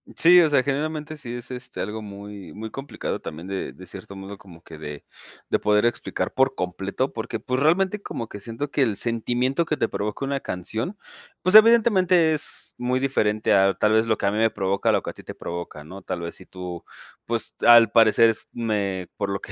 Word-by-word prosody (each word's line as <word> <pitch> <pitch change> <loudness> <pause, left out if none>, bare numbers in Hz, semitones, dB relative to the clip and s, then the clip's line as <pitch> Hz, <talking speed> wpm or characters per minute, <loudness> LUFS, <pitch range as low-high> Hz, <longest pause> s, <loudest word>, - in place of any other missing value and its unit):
Sí, 175 +2 +7
o 160 - +3
sea, 140 -3 +3
generalmente 150 +2 -3
sí 120 -4 -6
es, 120 +2 -7
este, 125 0 -6
algo 105 +2 -4
muy 100 -1 -9
muy 110 +1 -7
complicado 135 +1 -5
también 80 +4 -8
de 95 -1 -4
de 95 - -13
cierto 95 +2 -10
modo 95 +1 -8
como 90 -5 -16
que 80 - -11
de 75 -1 -8 0.5
de - - +2
poder 105 +1 +2
explicar 120 - -2
por 135 0 +2
completo, 95 +8 -3
porque, 115 0 -4
pues, 130 +3 -2
realmente 190 +6 +2
como 115 - -5
que 105 - -9
siento 115 +7 -5
que 145 - 0
el 115 -6 +2
sentimiento 120 +7 0
que 155 - -2
te - - +1
provoca 105 +7 -3
una 140 0 -1
canción, 110 - -4 0.5
pues, 185 +1 +3
evidentemente 195 -7 +6
es 155 - 0
muy 125 +1 0
diferente 110 -6 +1
a 95 -1 +4
tal 105 +3 +2
vez 110 +1 +3
lo 110 -2 +1
que - - -3
a 100 - +3
mí 105 - -2
me 115 0 +4
provoca, 100 -1 0
lo - - +1
que - - -4
a - - -18
ti - - -13
te - - -9
provoca, 85 -3 -7
¿no? 95 +6 -10
Tal 90 - -5
vez 85 0 -5
si 95 - -13
tú, 90 -2 -7 0.4
pues, 115 -1 -2
al 120 -2 +8
parecer 115 0 +5
es 115 - -2
me 100 -6 -2
por 100 -1 -2
lo 100 0 -2
que - - -9
110 Hz, 220 wpm, -24 LUFS, 100-135 Hz, 0.5 s, al